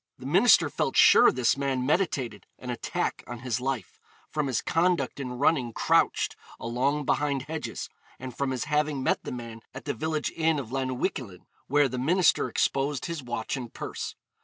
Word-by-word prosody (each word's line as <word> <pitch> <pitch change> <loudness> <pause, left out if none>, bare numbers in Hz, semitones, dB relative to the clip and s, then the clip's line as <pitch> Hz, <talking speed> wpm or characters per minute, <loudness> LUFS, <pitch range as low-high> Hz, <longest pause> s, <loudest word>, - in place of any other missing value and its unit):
The - - -11
minister - - +5
felt - - -2
sure - - +8
this 125 -1 +2
man 135 -2 -1
meditated 145 -5 -1
an 125 - -6
attack 120 - -2
on 120 -1 -7
his 125 -1 -2
life, 135 -2 -3 0.3
from 150 -2 -1
his 125 -4 0
conduct 165 -5 +1
in 125 -2 -4
running 130 -4 +2
crouched - - +2 0.2
along 135 +5 0
behind 140 -2 0
hedges, 155 +2 -5 0.3
and 130 -1 -8
from 140 -1 -1
his 130 -2 -2
having 150 -2 0
met - - +1
the - - -5
man 115 -2 -7
at - - -8
the - - -1
village 155 +4 -2
inn 160 -1 +1
of 125 -5 -5
Llanuwchllyn, 130 - -3 0.2
where 145 +1 +4
the 130 0 -4
minister 175 +8 +3
exposed 140 0 0
his 170 -3 -4
watch 120 +2 -3
and 125 -4 -7
purse. - - -5
135 Hz, 175 wpm, -27 LUFS, 125-150 Hz, 0.3 s, sure